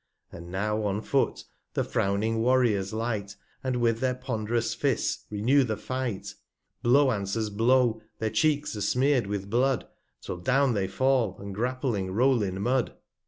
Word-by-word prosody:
40 - - -9
And 85 - -11
now 105 +3 -1
on 100 0 0
Foot 135 +4 0 0.3
the - - +1
frowning 105 +3 0
Warriors 115 -6 +2
light, 110 -3 -3 0.3
And 130 -1 -1
with 115 -2 +1
their 130 0 0
pond'rous 115 -3 -2
Fists 135 0 -1
renew 120 +7 +3
the 110 -4 -2
Fight; 130 -6 -4 0.5
Blow 130 +3 +4
answers 105 0 -2
Blow, 115 +1 +3 0.2
their 110 -1 -2
Cheeks 150 -5 +1
are 105 - -5
'smear'd 125 +2 +2
with 100 -1 -3
Blood, 130 +1 +2 0.4
'Till - - -5
down 130 +8 +2
they 100 -3 0
fall, 125 -2 +1
and 100 0 -7
grappling 120 -3 -1
roll 125 +2 +3
in 95 -2 -2
Mud. 125 +1 +1
115 Hz, 160 wpm, -27 LUFS, 105-130 Hz, 0.5 s, Blow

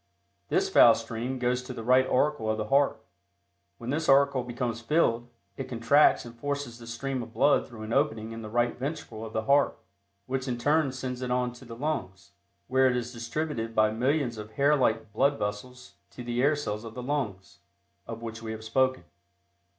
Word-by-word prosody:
This - - +2
foul - - +7
stream 120 +3 -4
goes 125 0 0
to 125 0 -8
the 115 - -6
right 130 +2 +4
auricle 130 -4 +1
of 110 - 0
the 105 0 -4
heart. 140 -5 +2 0.7
When 120 +2 -5
this 160 +2 -1
auricle 140 -1 +4
becomes 120 -1 -3
filled, 120 -4 +1 0.3
it 135 - -5
contracts 125 +4 +4
and 120 - -9
forces 140 -1 -4
the 115 - -11
stream 130 +3 -3
of 115 -1 -9
blood 145 +2 +3
through 115 -4 -10
an 110 +1 -4
opening 115 -6 0
in 115 0 -7
the 110 - -7
right 120 +2 +1
ventricle 135 -5 -5
of 110 - -7
the 110 0 -2
heart, 140 +4 +3 0.5
which 130 +2 -3
in 125 -1 -1
turn 145 +3 +2
sends 130 -1 -5
it 125 - -3
on 125 0 0
to 125 +1 -14
the 115 -1 -9
lungs, 115 -10 -4 0.4
where 130 0 +4
it 125 - +1
is 120 0 -3
distributed 115 -1 -3
by 110 0 +4
millions 125 0 0
of 105 +1 -9
hair 145 +3 +3
like 110 -6 0
blood 140 +5 +2
vessels 105 +5 -5 0.2
to 125 - -9
the 120 0 -1
air 145 +3 +4
cells 105 -7 -4
of 115 -1 -9
the 125 - -5
lungs, 110 -10 -3 0.5
of 115 0 -7
which 115 0 -6
we 110 -1 -5
have 110 0 -8
spoken. 130 0 +1
125 Hz, 200 wpm, -28 LUFS, 115-135 Hz, 0.7 s, foul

